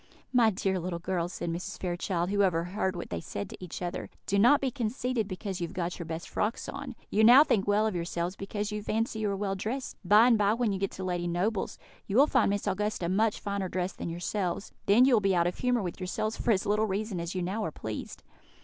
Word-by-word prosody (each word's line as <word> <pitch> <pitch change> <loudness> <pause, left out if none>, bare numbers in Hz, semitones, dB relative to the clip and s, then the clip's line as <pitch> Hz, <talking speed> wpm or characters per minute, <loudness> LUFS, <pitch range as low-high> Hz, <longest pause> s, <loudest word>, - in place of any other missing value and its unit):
"My 235 -3 +6
dear 190 -2 -1
little 175 0 -3
girls," 175 0 -2
said 170 -1 -3
Mrs. 170 +2 -5
Fairchild, 175 0 -1
who 205 0 +2
overheard 185 +1 0
what 175 - -6
they 85 - -2
said 100 +4 -6
to - - -10
each 180 0 -6
other, 175 +1 -4 0.2
"do 200 - +1
not 245 +7 +6
be 265 -2 -1
conceited 240 -1 -1
because 190 -1 -5
you 170 - -1
have - - -13
got 175 0 -3
your 170 - -5
best 165 +1 -5
frocks 215 +3 -2
on. - - -6 0.2
You 215 - +3
now 245 +6 +9
think 210 -10 +1
well 205 +1 +3
of 220 - 0
yourselves, 170 +1 -2
because 205 +2 -4
you 210 0 -3
fancy 220 +1 -1
you 215 -1 0
are 200 - -1
well 195 -1 -1
dressed; 225 +7 -4
by 210 +5 +6
and 235 -3 +4
by, 205 +1 +3
when 235 -3 +1
you 195 - -2
get 195 - 0
to 190 - -6
Lady 175 -1 -1
Noble's, 190 +5 -1 0.3
you 200 - 0
will 280 - +8
find 260 -8 +3
Miss 200 0 -1
Augusta 205 -3 -1
much 210 +3 +2
finer 200 -2 -3
dressed 180 +1 -3
than - - -3
yourselves; 180 +2 -3 0.2
then 220 +6 +6
you 265 - +4
will 220 - +5
be 195 -2 +2
out 170 -1 +3
of 175 - -2
humour 245 -3 +1
with 175 +1 -5
yourselves 205 +4 -2
for - - -3
as 200 -4 +3
little 215 +2 +2
reason 200 -1 -2
as 170 +2 -4
you 180 - -1
now 200 +5 -2
are - - -1
pleased." 110 -6 -6
195 Hz, 250 wpm, -29 LUFS, 180-215 Hz, 0.3 s, now